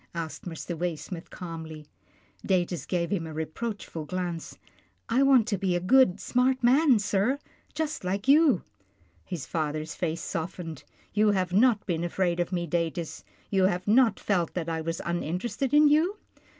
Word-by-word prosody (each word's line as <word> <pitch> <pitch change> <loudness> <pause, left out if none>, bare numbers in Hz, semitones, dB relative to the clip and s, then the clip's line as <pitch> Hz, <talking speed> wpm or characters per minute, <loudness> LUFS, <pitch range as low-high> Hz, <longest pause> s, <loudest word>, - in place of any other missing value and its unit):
asked 165 -2 -5
Mr. 170 0 -5
Waysmith 170 +1 -4
calmly. 160 -3 -8 0.6
Datus 180 -2 0
gave 170 -2 -1
him 170 -5 -1
a 160 - -7
reproachful 160 +1 -5
glance. 175 -1 -4 0.2
" - - -40
I 240 +3 +3
want 265 -5 +5
to 200 -4 -1
be 185 -2 +1
a - - +1
good, 200 +1 +4
smart 255 +1 +1
man, 265 +1 +5
sir, 205 +5 +1 0.4
just 310 -4 -2
like 195 +5 -2
you." 285 - +5 0.6
His 175 -7 -5
father's 155 0 -3
face 165 -2 -2
softened. 165 -2 -5 0.2
" - - -32
You 210 0 +4
have 185 -2 -1
not 220 +1 +4
been 170 -2 -1
afraid 175 0 0
of 175 +1 -1
me, 175 -2 -1
Datus. 170 0 -2 0.3
You 190 -2 +3
have 185 0 0
not 230 +2 +4
felt 180 -5 0
that 175 -3 -2
I 160 -1 -2
was 165 +1 -3
uninterested 180 - -2
in 300 +1 +6
you 320 +8 +3
180 Hz, 165 wpm, -27 LUFS, 165-230 Hz, 0.6 s, in